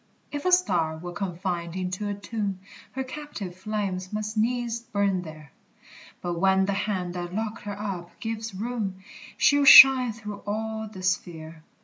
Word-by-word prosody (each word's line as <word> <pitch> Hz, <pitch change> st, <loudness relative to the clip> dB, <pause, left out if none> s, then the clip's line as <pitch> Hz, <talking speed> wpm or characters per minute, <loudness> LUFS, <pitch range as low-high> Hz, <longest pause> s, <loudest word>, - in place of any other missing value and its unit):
If 290 Hz, +2 st, -5 dB
a 365 Hz, -, +3 dB
star 175 Hz, -, +2 dB
were 175 Hz, +2 st, -7 dB
confined 175 Hz, -2 st, -4 dB
into 185 Hz, +2 st, -3 dB
a 205 Hz, -, -2 dB
tomb, 200 Hz, -1 st, -4 dB, 0.4 s
Her 265 Hz, +1 st, -3 dB
captive 260 Hz, -10 st, -7 dB
flames 190 Hz, -2 st, -4 dB
must 215 Hz, +1 st, -4 dB
needs 235 Hz, +1 st, 0 dB
burn 200 Hz, -5 st, -1 dB
there, 155 Hz, -4 st, -11 dB, 0.7 s
But 175 Hz, -1 st, -3 dB
when 190 Hz, +1 st, +3 dB
the 200 Hz, -, -1 dB
hand 190 Hz, -3 st, -2 dB
that 175 Hz, 0 st, -5 dB
locked 220 Hz, 0 st, -3 dB
her 205 Hz, 0 st, -5 dB
up 185 Hz, -5 st, -6 dB
gives 225 Hz, -2 st, -5 dB
room, 205 Hz, -3 st, -4 dB, 0.3 s
She'll 285 Hz, 0 st, +4 dB
shine 265 Hz, -3 st, +10 dB
through 210 Hz, -2 st, -8 dB
all 220 Hz, +1 st, -3 dB
the 185 Hz, -3 st, -9 dB
sphere. 165 Hz, -3 st, -3 dB
200 Hz, 155 wpm, -26 LUFS, 180-220 Hz, 0.7 s, shine